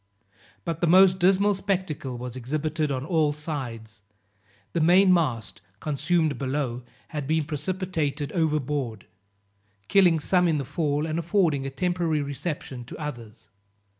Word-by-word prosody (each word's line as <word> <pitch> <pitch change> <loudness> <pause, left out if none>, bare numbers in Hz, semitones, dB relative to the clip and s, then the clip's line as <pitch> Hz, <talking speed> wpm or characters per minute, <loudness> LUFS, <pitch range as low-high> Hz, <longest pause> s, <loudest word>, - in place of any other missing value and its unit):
But 165 -2 -3
the 175 - +3
most 185 +2 +6
dismal 195 +3 +4
spectacle 185 -10 -3
was 125 0 -6
exhibited 150 +4 -2
on 130 0 -2
all 155 -3 +2
sides; 120 -8 -6 0.7
the 170 - +1
main 185 +3 +6
mast, 130 - -1 0.2
consumed 155 - 0
below, 130 -3 -2 0.3
had 150 -4 -4
been 160 0 +1
precipitated 155 -2 -2
overboard, 145 - -1 0.8
killing 180 -5 +5
some 180 +3 +3
in 160 -2 +2
the 140 - -3
fall, 150 +1 -1
and 160 +1 -2
affording 165 -6 +1
a - - -2
temporary 170 0 0
reception 140 -3 -5
to - - -9
others. 120 -8 -8
155 Hz, 135 wpm, -26 LUFS, 135-175 Hz, 0.8 s, most